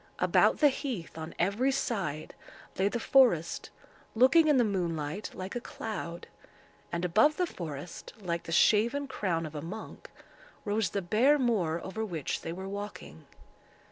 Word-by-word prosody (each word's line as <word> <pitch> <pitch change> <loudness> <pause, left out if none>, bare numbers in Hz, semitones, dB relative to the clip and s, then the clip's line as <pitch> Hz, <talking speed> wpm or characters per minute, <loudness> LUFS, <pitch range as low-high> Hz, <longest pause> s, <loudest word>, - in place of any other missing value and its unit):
About - - +3
the 295 - +6
heath, 255 - -5
on 160 0 -7
every 205 +10 +1
side, 190 - -2 0.5
lay 195 - +3
the 240 - -2
forest, 230 - +3 0.5
looking 285 +8 +6
in 295 -3 +5
the 245 - +5
moonlight 175 -3 -2
like 185 +3 -6
a 245 - -2
cloud; 180 -8 -6 0.7
and 170 +1 -1
above 220 - +4
the 360 - +2
forest, 165 - -7
like 170 -4 -3
the - - -6
shaven 230 - +3
crown 175 -10 -2
of 155 - -8
a 150 - -5
monk, 195 +8 -8 0.6
rose 210 -1 0
the 200 - -3
bare 245 +11 +4
moor 200 - +1
over 220 +4 -4
which 170 -9 -3
they - - -5
were 190 +3 -6
walking. 205 +1 -7
200 Hz, 155 wpm, -30 LUFS, 170-240 Hz, 0.7 s, the